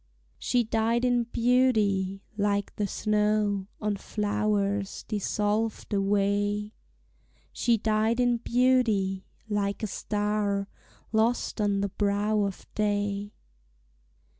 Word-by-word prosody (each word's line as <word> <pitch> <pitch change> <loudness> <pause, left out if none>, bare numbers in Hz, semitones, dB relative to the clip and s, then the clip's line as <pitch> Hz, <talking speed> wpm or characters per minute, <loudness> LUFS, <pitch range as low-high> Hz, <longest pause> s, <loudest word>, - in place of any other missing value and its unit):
She 245 -1 +1
died 225 +2 +1
in 245 -1 +2
beauty, 215 -6 +2
like 205 -1 0
the 205 - -1
snow 210 -2 +1
On 210 -1 -1
flowers 205 -1 -1
dissolved 210 +1 -1
away; 205 +1 +1 0.8
She 235 -1 +2
died 220 +2 +1
in 245 -1 +3
beauty, 230 -6 +1 0.2
like 205 0 -1
a - - +2
star 205 -1 -1 0.4
Lost 225 0 +1
on 200 -1 +1
the 200 - -1
brow 205 +2 +1
of 195 -1 -5
day. 205 -1 -1
210 Hz, 100 wpm, -27 LUFS, 200-220 Hz, 0.8 s, in